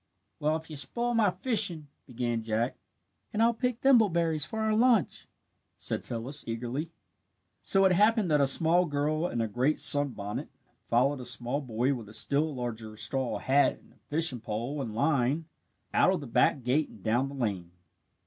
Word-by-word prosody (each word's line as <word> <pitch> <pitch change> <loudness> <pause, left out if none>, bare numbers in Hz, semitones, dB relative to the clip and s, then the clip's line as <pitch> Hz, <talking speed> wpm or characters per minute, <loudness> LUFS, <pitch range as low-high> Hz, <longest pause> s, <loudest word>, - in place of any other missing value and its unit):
"Well, 155 +1 +1
if 160 0 -6
you - - -6
spoil 235 - -1
my 220 -3 +3
fishing 180 - -1
" - - -47
began 120 -2 -2
Jack. 110 +2 -2 0.6
"And 215 +1 +1
I'll 235 +1 +3
pick 250 0 -2
thimbleberries 170 - +3
for 220 - -5
our 220 0 +1
lunch," 230 -2 +2 0.5
said - - -2
Phyllis, 130 +6 -3
eagerly. 120 +7 -4 0.7
So 195 0 +3
it 190 - +4
happened 210 0 +3
that 150 -1 +3
a 140 - +3
small 165 +6 +4
girl 150 +3 -1
in 120 - -3
a 115 - -1
great 125 +8 0
sunbonnet 125 -8 +3 0.4
followed 130 +4 +1
a 125 - -8
small 125 +3 0
boy 125 +1 -1
with 115 -5 -8
a 105 - -8
still 145 +6 +1
larger 110 -3 -6
straw 120 +4 -1
hat 140 +2 +2
and - - -22
a - - -28
fishing 150 -4 0
pole 115 +7 -4
and 110 -5 -6
line, 140 +4 +1 0.5
out - - +4
of 190 - -1
the 145 - -8
back 125 +2 +1
gate 140 +5 0
and 100 - -16
down 120 +5 0
the 140 - -9
lane. 100 -9 -3
140 Hz, 180 wpm, -28 LUFS, 120-170 Hz, 0.7 s, it